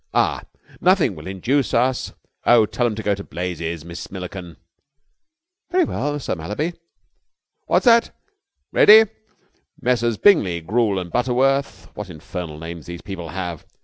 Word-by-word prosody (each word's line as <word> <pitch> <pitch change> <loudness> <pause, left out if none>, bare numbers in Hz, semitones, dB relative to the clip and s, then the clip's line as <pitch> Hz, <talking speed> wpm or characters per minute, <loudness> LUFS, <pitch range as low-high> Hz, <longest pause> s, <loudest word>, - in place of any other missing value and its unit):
Ah!... - - +2 0.4
nothing 180 - +3
will 75 +3 -10
induce 120 +9 0
us... 125 +2 +1 0.4
oh, 120 -2 +6
tell 120 +3 -1
'em 110 - -3
to 110 - -6
go 105 - +1
to 100 0 -6
blazes, 85 -3 -5
Miss 85 0 -8
Milliken." 90 -2 -8 1.1
"Very 360 +1 +3
well, 145 - -2
Sir - - -3
Mallaby." 105 - -3 1.0
"That's - - +2
that. 235 -1 +5 0.6
Ready? 220 +1 +8 0.8
Messrs. 120 -2 +1
Brigney, 90 - +3
Goole 105 0 +1
and 90 -2 -5
Butterworth. 125 -5 0
What 105 -2 -7
infernal 85 -1 -7
names 80 0 -8
these 85 0 -8
people 90 -4 -7
have. 85 -3 -5
100 Hz, 140 wpm, -21 LUFS, 85-130 Hz, 1.1 s, Ready